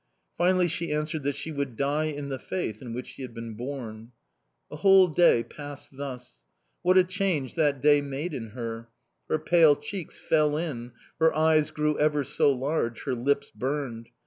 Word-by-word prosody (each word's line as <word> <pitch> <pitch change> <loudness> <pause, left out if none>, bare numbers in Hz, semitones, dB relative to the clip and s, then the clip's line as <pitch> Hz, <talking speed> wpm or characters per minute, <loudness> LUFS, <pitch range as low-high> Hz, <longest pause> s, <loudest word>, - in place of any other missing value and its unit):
Finally 180 +1 +3
she 170 0 -2
answered 150 +1 -1
that 140 0 -1
she 160 - -5
would 140 -5 -3
die 145 +4 0
in 145 -2 -4
the 135 -1 -4
faith 110 - -4
in 125 -3 -7
which 125 +2 -5
she - - -11
had 125 -3 -7
been 115 -1 -6
born. 120 -2 -7 0.6
A 150 - -6
whole 190 +3 +6
day 160 -8 +4
passed 145 0 -10
thus. 125 - -8 0.4
What 185 +1 +4
a 185 - +8
change 185 - -1
that 145 -5 +1
day 145 -1 +6
made 145 +4 -4
in 115 -5 -5
her! 115 -1 -5 0.4
Her - - +2
pale 155 -1 +5
cheeks 165 +5 -7
fell 150 -2 +2
in, 125 -8 -4 0.3
her 160 0 +5
eyes 155 -1 +3
grew 150 0 -1
ever 150 -1 +2
so 140 - +2
large, 130 -3 -1
her - - -1
lips 140 +3 0
burned. 130 -4 -4
145 Hz, 180 wpm, -27 LUFS, 125-155 Hz, 0.6 s, a